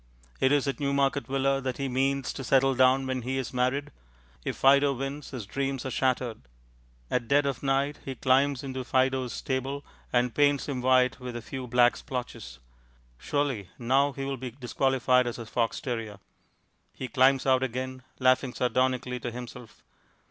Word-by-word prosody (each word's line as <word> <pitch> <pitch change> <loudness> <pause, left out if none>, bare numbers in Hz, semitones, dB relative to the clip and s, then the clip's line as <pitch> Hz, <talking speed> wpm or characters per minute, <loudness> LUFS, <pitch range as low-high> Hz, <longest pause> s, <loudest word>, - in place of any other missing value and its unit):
It 130 - +3
is 145 -1 +2
at 135 -3 -2
Newmarket 140 0 +1
Villa 135 0 +1
that 130 -1 -3
he 140 - -2
means 135 +1 0
to 135 - -6
settle 135 +1 +3
down 130 +1 +4
when 130 -1 -2
he 130 +3 -2
is 130 -1 -4
married. 130 +3 0 0.5
If - - -3
Fido 140 +1 +5
wins, 135 +3 -5
his 125 -6 -6
dreams 135 +5 -3
are 130 - -3
shattered. 125 - 0 0.7
At 120 -2 0
dead 140 +3 +3
of 135 -3 -2
night 140 +1 0
he 135 - -5
climbs 135 +1 +2
into 130 -1 -4
Fido's 130 -1 +1
stable, 135 +4 -3 0.3
and 125 -1 +2
paints 145 -1 +2
him 135 -3 -3
white 130 0 +3
with 125 -1 -6
a 120 - -4
few 130 0 -6
black 120 0 +4
splotches. 120 - -6 0.6
Surely 125 - -1
now 135 +4 +2
he 135 0 -5
will 135 0 -3
be 130 0 -5
disqualified 125 0 +1
as 120 - -4
a 115 - -7
fox 115 +1 -1
terrier! 115 -5 -4 0.8
He 130 - -5
climbs 130 +2 +3
out 130 -1 +4
again, 130 +1 -3 0.2
laughing 130 0 +2
sardonically 125 0 0
to 120 - -4
himself.... 120 -1 -10
130 Hz, 170 wpm, -28 LUFS, 125-135 Hz, 0.8 s, Fido